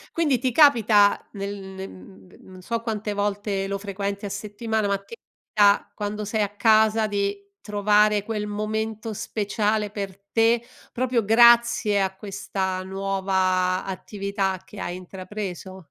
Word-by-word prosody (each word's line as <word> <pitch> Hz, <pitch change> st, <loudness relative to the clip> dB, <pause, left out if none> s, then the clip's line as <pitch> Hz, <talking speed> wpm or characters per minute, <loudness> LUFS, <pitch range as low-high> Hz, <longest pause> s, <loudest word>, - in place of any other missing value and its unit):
Quindi 295 Hz, -7 st, +2 dB
ti 255 Hz, -1 st, 0 dB
capita, 225 Hz, -8 st, +5 dB
nel 200 Hz, 0 st, -4 dB
nel 190 Hz, -1 st, -8 dB
n 95 Hz, 0 st, -15 dB
non 185 Hz, -1 st, -13 dB
so 230 Hz, +4 st, -3 dB
quante 215 Hz, -2 st, -3 dB
volte 205 Hz, -1 st, -2 dB
lo 200 Hz, 0 st, -2 dB
frequenti 200 Hz, 0 st, -4 dB
a 200 Hz, -, -3 dB
settimana, 210 Hz, +1 st, -2 dB
ma 200 Hz, -, +1 dB
ti 200 Hz, +4 st, -12 dB
capita, 205 Hz, -3 st, +1 dB
quando 210 Hz, 0 st, -4 dB
sei 215 Hz, +1 st, -1 dB
a 205 Hz, -, +1 dB
casa, 220 Hz, 0 st, +4 dB
di 200 Hz, -1 st, -2 dB
trovare 210 Hz, 0 st, +2 dB
quel 210 Hz, -1 st, -3 dB
momento 215 Hz, +1 st, -3 dB
speciale 210 Hz, 0 st, -1 dB
per 195 Hz, -2 st, -5 dB
te, 230 Hz, +1 st, +3 dB, 0.3 s
proprio 245 Hz, -2 st, 0 dB
grazie 235 Hz, -2 st, +5 dB
a 190 Hz, 0 st, -1 dB
questa 190 Hz, -2 st, -3 dB
nuova 190 Hz, -1 st, 0 dB
attività 195 Hz, 0 st, -3 dB
che 205 Hz, -, -12 dB
hai 175 Hz, -, -4 dB
intrapreso? 185 Hz, 0 st, -7 dB
205 Hz, 140 wpm, -24 LUFS, 195-220 Hz, 0.3 s, capita